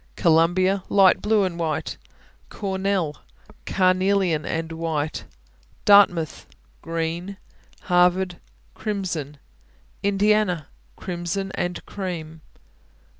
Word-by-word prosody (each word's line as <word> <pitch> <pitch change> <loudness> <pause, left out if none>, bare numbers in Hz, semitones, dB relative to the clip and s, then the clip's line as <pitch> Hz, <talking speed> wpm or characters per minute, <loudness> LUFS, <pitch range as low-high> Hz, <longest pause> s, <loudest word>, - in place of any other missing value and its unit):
Columbia 180 +4 +3
Light 195 -2 +5
blue 210 -1 +2
and 175 -2 -3
white. 160 -2 -2 0.5
Cornell 190 -5 -2 0.5
Carnelian 185 -3 +2
and 165 0 -3
white. 160 -2 -3 0.6
Dartmouth 180 -7 +4 0.3
Green. 165 +4 -3 0.4
Harvard 180 0 +2 0.4
Crimson. 175 -9 -4 0.6
Indiana 200 -5 +1 0.3
Crimson 185 +2 -4
and 175 0 -3
cream. 165 -5 -6
180 Hz, 75 wpm, -23 LUFS, 165-195 Hz, 0.6 s, Light